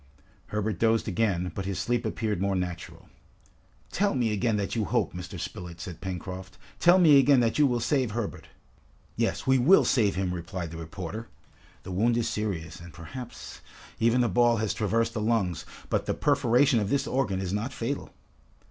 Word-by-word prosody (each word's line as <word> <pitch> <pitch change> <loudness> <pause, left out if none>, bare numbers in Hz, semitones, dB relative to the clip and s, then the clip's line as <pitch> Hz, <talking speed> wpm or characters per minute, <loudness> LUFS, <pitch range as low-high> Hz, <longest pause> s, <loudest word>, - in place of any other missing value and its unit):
Herbert 105 0 -2
dozed 115 0 +2
again, 90 -4 0
but 95 - -4
his 95 -1 -3
sleep 120 +5 0
appeared 105 -5 -2
more 100 0 +1
natural. 90 -2 -5 0.8
"Tell 200 -5 +1
me 115 -4 +1
again 110 +1 +1
that 100 +2 -2
you 110 -2 0
hope, - - 0
Mr. 90 +1 -7
Spilett," 90 0 -7
said 85 -1 -8
Pencroft. 95 0 -6 0.2
"Tell 175 +2 +6
me 155 -6 +7
again 135 0 +5
that 115 +4 +1
you 145 - +6
will 120 -2 0
save 130 0 +1
Herbert!" 110 -1 -4 0.7
"Yes, - - -1
we 130 0 +4
will 165 +11 +6
save 105 -7 +2
him!" 90 -1 -1
replied 85 -1 -5
the 85 - -7
reporter. 90 +7 -6 0.6
"The - - -7
wound 115 +6 +2
is 120 - 0
serious, 90 -7 -3
and, 85 0 -11
perhaps, 115 +10 -9 0.4
even 115 +2 +3
the 120 - +3
ball 120 +3 +3
has 110 -1 -1
traversed 115 +2 0
the 110 - -3
lungs, 105 -6 0 0.2
but - - -1
the - - 0
perforation 130 -3 +3
of 100 -2 -1
this 140 +2 +1
organ 115 -10 0
is 95 -1 -3
not 110 +6 -2
fatal." 135 +2 -4
110 Hz, 185 wpm, -27 LUFS, 90-120 Hz, 0.8 s, me